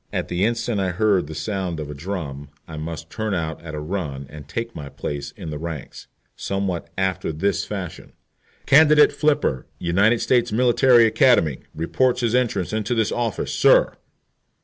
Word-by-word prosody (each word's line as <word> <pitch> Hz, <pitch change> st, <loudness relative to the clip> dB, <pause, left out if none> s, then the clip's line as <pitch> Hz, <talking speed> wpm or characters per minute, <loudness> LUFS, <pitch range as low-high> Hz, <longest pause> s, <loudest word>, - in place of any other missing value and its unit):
* -, -, -44 dB
At -, -, -3 dB
the 90 Hz, +2 st, -1 dB
instant 115 Hz, -1 st, 0 dB
I 95 Hz, -, 0 dB
heard 95 Hz, -2 st, +1 dB
the 80 Hz, -, -8 dB
sound 95 Hz, -3 st, -3 dB
of 75 Hz, -1 st, -5 dB
a -, -, -5 dB
drum 75 Hz, -4 st, -6 dB, 0.2 s
I 80 Hz, -, -8 dB
must 80 Hz, +1 st, -6 dB
turn 110 Hz, -2 st, -2 dB
out 80 Hz, -2 st, -3 dB
at 80 Hz, -2 st, -7 dB
a -, -, -4 dB
run 75 Hz, -4 st, -4 dB
and 75 Hz, -2 st, -10 dB
take 115 Hz, +9 st, -5 dB
my 70 Hz, -2 st, -7 dB
place 70 Hz, 0 st, -5 dB
in 85 Hz, -6 st, -7 dB
the 75 Hz, -, -5 dB
ranks. 80 Hz, -4 st, -7 dB, 0.3 s
*Somewhat 95 Hz, -4 st, -3 dB
after 95 Hz, -3 st, -1 dB
this 100 Hz, +5 st, -1 dB
fashion: 95 Hz, -5 st, -7 dB, 0.5 s
"Candidate 150 Hz, +1 st, +6 dB
F, 145 Hz, -, +2 dB, 0.2 s
United 100 Hz, +7 st, +2 dB
States 120 Hz, -1 st, +2 dB
Military 120 Hz, +1 st, +5 dB
Academy, 110 Hz, -, +3 dB, 0.2 s
reports 125 Hz, +10 st, +1 dB
his 120 Hz, -2 st, 0 dB
entrance 110 Hz, -7 st, 0 dB
into 110 Hz, +3 st, -1 dB
this 110 Hz, -2 st, +1 dB
office, 120 Hz, -3 st, -2 dB
sir." -, -, +4 dB
95 Hz, 170 wpm, -22 LUFS, 80-115 Hz, 0.5 s, Candidate